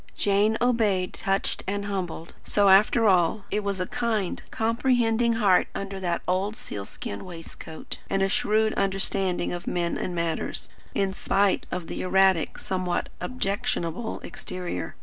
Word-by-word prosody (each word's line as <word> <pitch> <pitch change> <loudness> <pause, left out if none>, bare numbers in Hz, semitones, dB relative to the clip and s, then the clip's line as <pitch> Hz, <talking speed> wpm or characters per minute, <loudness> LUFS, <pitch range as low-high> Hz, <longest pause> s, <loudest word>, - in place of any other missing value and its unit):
Jane 205 +2 +3
obeyed, 215 -7 +2
touched 195 0 -1
and 200 +1 -1
humbled. 180 -4 -4
So, 205 -1 +3
after 215 +4 +6
all, 185 +2 +3
it 210 - 0
was 200 -1 -1
a 180 - 0
kind, 215 -3 -1
comprehending 235 0 +2
heart 205 -5 +4
under 195 0 -4
that 175 -2 -1
old 190 +4 0
sealskin 100 - -6
waistcoat; 165 -2 -8
and 195 0 +1
a - - +3
shrewd 215 +2 +2
understanding 195 -2 0
of 175 0 -6
men 170 -1 -1
and 180 - -3
matters, 170 -1 -2 0.3
in 195 -1 +1
spite 195 0 +1
of 180 -2 -3
the - - -5
erratic, 190 -3 +3
somewhat 185 -2 -2
objectionable 200 -3 -2
exterior. 175 - -5
195 Hz, 140 wpm, -26 LUFS, 180-210 Hz, 0.3 s, after